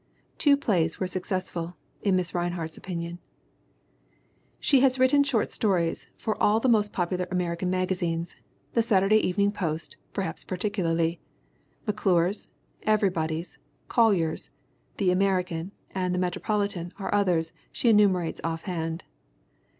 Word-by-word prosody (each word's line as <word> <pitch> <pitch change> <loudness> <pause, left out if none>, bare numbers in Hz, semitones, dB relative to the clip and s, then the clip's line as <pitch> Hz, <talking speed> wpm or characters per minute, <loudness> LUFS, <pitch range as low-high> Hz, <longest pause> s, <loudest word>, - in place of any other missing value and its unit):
"Two 285 -2 +5
plays 175 - +1
were 185 - 0
successful," 180 -2 -3 0.2
in 195 -3 +3
Mrs. 180 -1 -2
Rinehart's 175 -2 -2
opinion. 170 -1 -5 1.4
She 275 - +4
has 260 0 +4
written 265 +2 +5
short 260 -6 0
stories 180 -6 0
for 220 - -3
all 210 +2 +4
the 260 - +1
most 210 -4 +3
pop 175 -1 -1
ular 180 -1 -1
American 180 0 -1
magazines 180 -2 -1 0.4
the 230 - +4
Saturday 210 -2 +4
Evening 200 0 +2
Post 165 -6 -3
perhaps 195 -2 -3
particularly; 170 -4 -1 0.6
McClure's, 195 -3 +1 0.3
Everybody's, 175 -6 0 0.3
Collier's, 200 - +2 0.5
the 185 -2 +3
American 180 -2 0 0.2
and 180 -1 -1
the - - 0
Metropolitan 185 0 -1
are 200 - -3
others 180 -5 +2 0.2
she - - -1
enumerates 195 -6 +3
offhand. 165 0 -3
185 Hz, 120 wpm, -27 LUFS, 170-205 Hz, 1.4 s, Two